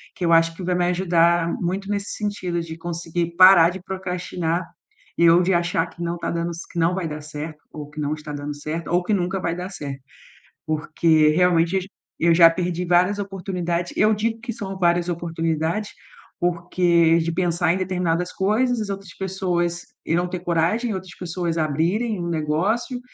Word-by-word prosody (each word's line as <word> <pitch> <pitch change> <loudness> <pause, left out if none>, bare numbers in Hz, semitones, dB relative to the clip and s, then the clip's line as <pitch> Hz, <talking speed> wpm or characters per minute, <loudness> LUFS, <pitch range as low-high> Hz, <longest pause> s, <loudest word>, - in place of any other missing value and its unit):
que 180 - -3
eu 170 - +3
acho 165 0 +4
que 185 - -6
vai 180 0 0
me 175 0 +1
ajudar 170 -2 +2
muito 190 +3 -2
nesse 200 -1 -2
sentido 195 -5 -2
de 165 -1 -7
conseguir 170 0 -3
parar 185 -3 +8
de 185 0 -8
procrastinar 180 -2 -3 0.6
e 170 0 +6
ou 170 +2 +6
de 190 - +2
achar 170 -1 +1
que 170 - -13
não 170 0 -2
tá - - -3
dando 170 0 -2
ce 165 - -7
que 170 - -4
não 170 +2 +2
vai 190 -3 -2
dar 150 -1 -5
certo, 150 +1 -7
ou 150 -1 -7
que 150 +1 -10
não 150 0 -1
está 150 -1 -7
dando 145 0 -5
certo, 155 +2 -5
ou 175 +1 +2
que 210 - 0
nunca 185 0 0
vai 165 - -1
dar 180 +1 -5
certo. 140 -7 -7 0.6
Porque 155 0 +2
realmente 170 +1 +3
eu 190 - +2
j 190 - -10 0.3
eu 165 0 +4
já 165 -1 +8
perdi 180 +1 -2
várias 180 +3 +3
oportunidades 180 -3 -3
eu 215 +1 +4
digo 225 +2 -1
que 240 0 -5
são 195 -3 -6
várias 175 0 +2
oportunidades, 165 +3 -2 0.5
porque 170 -1 +2
de 165 0 -1
pensar 175 -1 +1
em - - -1
determinadas 180 -2 -1
coisas, 225 +5 +1
as 210 - -4
outras 195 -2 -6
pessoas 175 -2 -1 0.2
irão 175 +2 +1
ter 180 - -4
coragem 175 +7 0
e - - -1
outras 185 -2 -8
pessoas 170 -1 -3
abrirem 170 +9 0
um 170 - -3
negócio 175 - -1
175 Hz, 190 wpm, -22 LUFS, 165-185 Hz, 0.6 s, parar